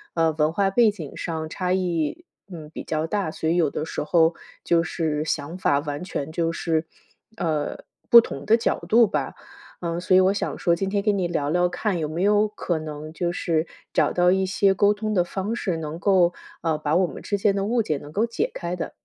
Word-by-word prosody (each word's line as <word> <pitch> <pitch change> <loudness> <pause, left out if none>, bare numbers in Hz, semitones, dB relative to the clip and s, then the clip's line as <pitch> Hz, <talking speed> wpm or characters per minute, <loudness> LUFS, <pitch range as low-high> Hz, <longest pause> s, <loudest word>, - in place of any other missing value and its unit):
嗯， 165 -2 +2
文 150 0 +2
化 195 +3 +1
背 220 +1 +4
景 165 -8 -9
上 160 -2 -4
差 180 +3 -3
异， 180 - -1 0.3
嗯， 155 -3 -8
比 - - -7
较 155 0 -2
大， 195 -2 -1
所 160 - -2
以 170 - +2
有 165 -5 +3
的 155 - -4
时 - - -4
候， 165 +2 +3 0.3
就 170 -1 +3
是 155 -3 -2
想 155 +2 -3
法 145 -6 +2
完 145 +1 -5
全 155 -5 -4
就 165 0 0
是， 165 -1 -1 0.5
呃， 155 -3 -1 0.3
不 235 - +11
同 - - -4
的 225 +1 +5
角 235 - 0
度 230 +2 +6
吧。 - - -3 0.5
嗯， 170 0 -2
所 185 +1 +2
以 - - +8
我 185 +1 +4
想 - - -3
说 170 -2 +2
今 195 +3 -2
天 200 0 +1
跟 205 -1 +1
你 180 -2 0
聊 150 -4 -1
聊 175 +3 +2
看， 185 +1 -2
有 155 - -2
没 160 +3 -4
有 210 +2 +4
可 185 -5 -3
能 155 0 -7
就 175 +1 -1
是， 165 -2 0 0.3
找 - - +2
到 180 0 +4
一 190 0 +2
些 195 +1 +2
沟 205 +1 +4
通 215 +1 -3
的 185 -4 +3
方 195 +5 -3
式， 190 -6 -2
能 160 0 -5
够， 180 -2 +3 0.3
呃， 160 -2 0
把 150 0 -1
我 185 +1 +3
们 - - -8
之 205 - -1
间 200 0 +2
的 195 0 -1
误 235 +3 +1
解 155 -9 -1
能 145 +1 -11
够 205 +8 0
解 230 - -2
开 175 0 -4
的。 170 -2 -5
175 Hz, 245 characters per minute, -24 LUFS, 160-195 Hz, 0.5 s, 不